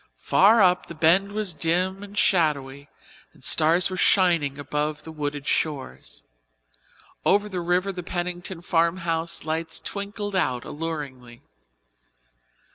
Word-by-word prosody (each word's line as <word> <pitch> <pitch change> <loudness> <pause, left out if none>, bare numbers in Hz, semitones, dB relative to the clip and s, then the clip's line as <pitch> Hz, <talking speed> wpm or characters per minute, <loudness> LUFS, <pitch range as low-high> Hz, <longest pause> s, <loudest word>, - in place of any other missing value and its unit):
Far 210 - +5
up 180 -1 +3
the 170 - -9
Bend 175 +6 +3
was 205 -3 -2
dim 180 +5 0
and 205 0 -10
shadowy 145 -7 +1 0.4
and - - -20
stars 170 +5 +3
were 185 - -4
shining 170 -9 +3
above 150 +1 -3
the 160 - -9
wooded 145 -2 -4
shores. 135 - -3 1.0
Over 205 +2 +3
the 185 -3 -4
river 180 +3 0
the 180 -1 -6
Pennington 175 0 -4
farmhouse 170 -1 0
lights 160 +1 -2
twinkled 205 0 -5
out 130 -9 0
alluringly. 140 -7 -6
170 Hz, 120 wpm, -24 LUFS, 150-185 Hz, 1.0 s, Far